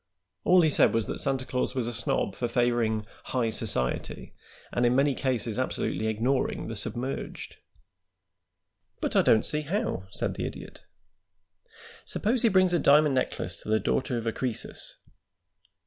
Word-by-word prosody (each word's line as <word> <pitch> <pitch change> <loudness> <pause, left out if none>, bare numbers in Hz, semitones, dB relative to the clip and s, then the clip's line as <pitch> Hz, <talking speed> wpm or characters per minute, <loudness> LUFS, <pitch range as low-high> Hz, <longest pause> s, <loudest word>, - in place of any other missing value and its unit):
All 180 0 +6
he 155 - +3
said - - +4
was 115 -2 +2
that - - -4
Santa 135 -2 -1
Claus 125 +1 -2
was 125 -3 0
a 120 - -3
snob 110 -3 -1
for 120 - -2
favoring 115 -3 +1 0.2
'high 120 -3 0
society' 80 - -1 0.4
and 120 - +1
in 120 +1 +3
many 140 +1 +3
cases 125 -4 -1
absolutely 120 -3 -1
ignoring 120 +5 0
the 115 - -5
submerged." 125 +5 -3 1.4
"But - - -2
I - - +6
don't 110 - +4
see 150 -1 +3
how," 170 - -2
said - - -2
the - - -3
Idiot. - - -10 1.2
"Suppose 230 +3 0
he 230 - +5
brings 185 -2 +4
a 175 - +3
diamond 150 0 +5
necklace 130 - -1
to - - -10
the 110 0 +3
daughter 130 +1 -1
of 115 - -4
a 115 - +1
Croesus?" 120 -1 -4
125 Hz, 160 wpm, -27 LUFS, 115-140 Hz, 1.4 s, All